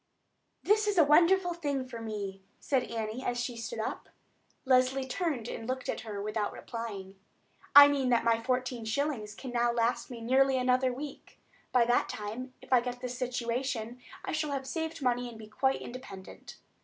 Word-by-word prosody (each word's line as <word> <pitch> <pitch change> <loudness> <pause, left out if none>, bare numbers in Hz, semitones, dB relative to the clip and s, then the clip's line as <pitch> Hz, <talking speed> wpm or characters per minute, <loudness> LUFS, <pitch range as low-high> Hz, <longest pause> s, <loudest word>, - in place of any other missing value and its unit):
"This 425 +1 +3
is 410 -2 +1
a 330 - +8
wonderful 350 +5 +5
thing 285 -6 -2
for 235 -2 -7
me," 200 -3 -5 0.2
said 265 -3 0
Annie 225 +2 -3
as 245 -1 -1
she 240 0 -3
stood 230 - -5
up. - - -4 0.6
Leslie 260 +1 +3
turned 270 - -2
and 225 0 -6
looked 255 0 -3
at - - -2
her 210 -3 -6
without 210 0 -2
replying. 200 -5 -7 0.6
"I 285 0 +12
mean 275 -3 +1
that 235 -2 +3
my 230 0 +2
fourteen 250 -1 -1
shillings 220 -3 -2
can 260 +2 -7
now 240 0 +2
last 235 0 0
me 245 -2 -7
nearly 265 +3 +3
another 255 0 +2
week. 280 +3 -8 0.3
By 245 -2 +4
that 240 +1 +2
time, 225 +5 -5
if 260 - -2
I 250 - +6
get 245 0 -5
this 250 0 -5
situation, 245 -1 -2 0.2
I - - -3
shall 305 -2 -1
have 270 -1 -3
saved 320 0 -4
money 245 -1 +1
and 230 - -11
be 220 - -9
quite 265 +5 0
independent. 240 -7 -10
250 Hz, 180 wpm, -30 LUFS, 230-270 Hz, 0.6 s, I